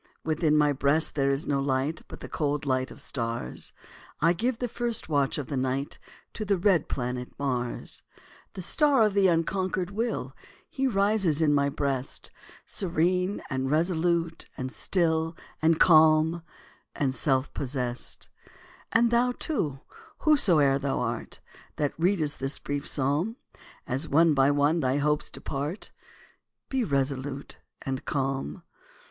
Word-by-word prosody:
Within 155 -1 +2
my 150 -1 +4
breast 145 +3 +2
there 140 -2 +1
is 140 +1 0
no 140 -1 +1
light, 135 +3 0
But - - -10
the - - -6
cold 145 -1 -1
light 130 -1 0
of - - -12
stars; 115 - -4 0.5
I 165 +3 +4
give 235 +7 -1
the 245 - -2
first 235 -5 -2
watch 140 -3 +1
of 145 - -3
the 140 - -3
night 130 +2 -2 0.3
To 215 - -4
the 200 -2 +1
red 180 -4 +2
planet 125 -1 -3
Mars. 125 -3 -3 0.5
The 185 - -5
star 285 - +3
of 210 -2 +2
the 195 -1 +4
unconquered 185 +2 0
will, 225 +3 -2 0.3
He 270 -4 -1
rises 200 - +2
in 155 -2 +3
my 140 0 +3
breast, 140 -2 -3 0.3
Serene, 180 +1 0
and 130 -2 -2
resolute, 165 +1 0
and 130 0 -4
still, 165 -1 0 0.2
And 160 0 +3
calm, 160 0 +5 0.5
and 135 -3 0
self 130 +1 +1
possessed. 125 -3 -4 0.6
And 235 0 +4
thou, 245 +1 +3
too, 150 - -2 0.4
whosoe'er 165 - +4
thou 140 -1 -1
art, 120 -2 -3 0.4
That 145 -2 -1
readest 165 -4 +1
this 135 +2 -2
brief 145 0 -3
psalm, 145 - 0 0.5
As 130 +3 -2
one 160 +2 +5
by 135 0 +4
one 145 +3 +3
thy 130 -2 +1
hopes 150 +1 +1
depart, 145 +8 -5 0.8
Be 265 -2 0
resolute 140 - -2 0.3
and 135 -1 -3
calm. 135 - -2
150 Hz, 140 wpm, -27 LUFS, 135-180 Hz, 0.8 s, calm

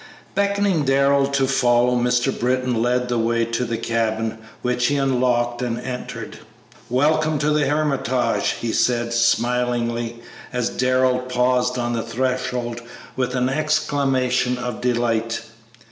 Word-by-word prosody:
Beckoning 200 -4 +1
Darrell 140 0 +3
to 140 -1 +1
follow, 125 -2 +3
Mr. 125 +1 +2
Britton 125 -1 0
led 125 +1 +1
the 120 -1 0
way 115 0 +1
to 115 +2 -2
the 115 -1 -2
cabin, 110 -1 -1 0.2
which 125 0 +1
he 145 - +1
unlocked 125 -3 +1
and 120 -1 -2
entered. 125 0 -6 0.5
"Welcome 155 +4 +2
to 150 +1 +1
the 150 -2 +2
'Hermitage!'" 130 -7 0
he 115 - -2
said, 120 0 +1
smilingly, 120 0 0 0.3
as 125 -2 -1
Darrell 130 0 +2
paused 125 0 +1
on 120 -1 -1
the 115 - -1
threshold 120 0 -2 0.3
with 125 0 -1
an 125 0 +1
exclamation 135 -4 +1
of 125 -2 -5
delight. 115 -2 0
125 Hz, 130 wpm, -21 LUFS, 120-135 Hz, 0.5 s, Darrell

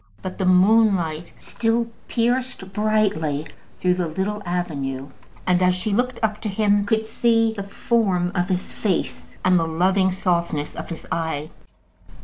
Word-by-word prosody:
But 185 +1 -6
the 190 - +1
moonlight 185 -4 +3
still 230 +1 0 0.2
pierced 240 -4 -1
brightly 205 -9 +1 0.3
through 180 -1 +3
the 180 -1 -1
little 195 +6 -2
avenue, 140 -6 -3 0.4
and 180 -1 +3
she, 185 - +3
as 180 0 +3
she 200 +3 -2
looked 245 +2 0
up 215 -1 0
to 215 - -2
him, 205 0 +2
could 220 0 +1
see 225 0 +2
the 205 - -5
form 195 -3 0
of 180 0 0
his 185 0 -2
face 195 -5 -2
and 185 -1 +5
the 165 - 0
loving 185 +3 +2
softness 170 -5 -1
of - - -6
his 165 - -7
eye. 160 -2 -2
190 Hz, 155 wpm, -23 LUFS, 175-215 Hz, 0.4 s, and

